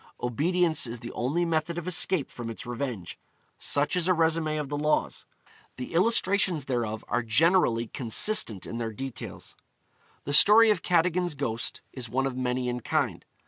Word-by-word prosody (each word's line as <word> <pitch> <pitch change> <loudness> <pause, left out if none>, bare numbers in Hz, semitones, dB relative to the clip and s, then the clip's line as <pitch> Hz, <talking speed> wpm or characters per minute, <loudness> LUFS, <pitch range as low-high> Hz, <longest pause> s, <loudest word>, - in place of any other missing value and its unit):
Obedience 160 +5 +1
is 115 0 -6
the 120 - -7
only 150 +8 -1
method 165 0 -1
of 175 0 -5
escape 180 -3 0
from 120 -2 -7
its 115 - -8
revenge. 120 -6 -5 0.4
Such 145 +4 +1
is 180 -1 +1
a - - +5
resumé 160 -2 +1
of 150 - -4
the 145 - -4
laws. 150 +1 -1 0.5
The 125 +4 -7
illustrations 190 -4 +2
thereof 115 -5 -3
are 120 - 0
generally 120 0 +2
consistent 115 - +1
in 115 - -6
their 115 -1 -4
details. 135 +2 -7 0.7
The 145 - -4
story 215 +8 +7
of 195 -5 0
Cadogan's 175 -1 +1
ghost 115 -5 -4
is 125 -3 -6
one 135 +4 0
of 135 -2 -3
many 125 0 -2
in 125 0 -2
kind. - - -2
145 Hz, 165 wpm, -27 LUFS, 120-175 Hz, 0.7 s, story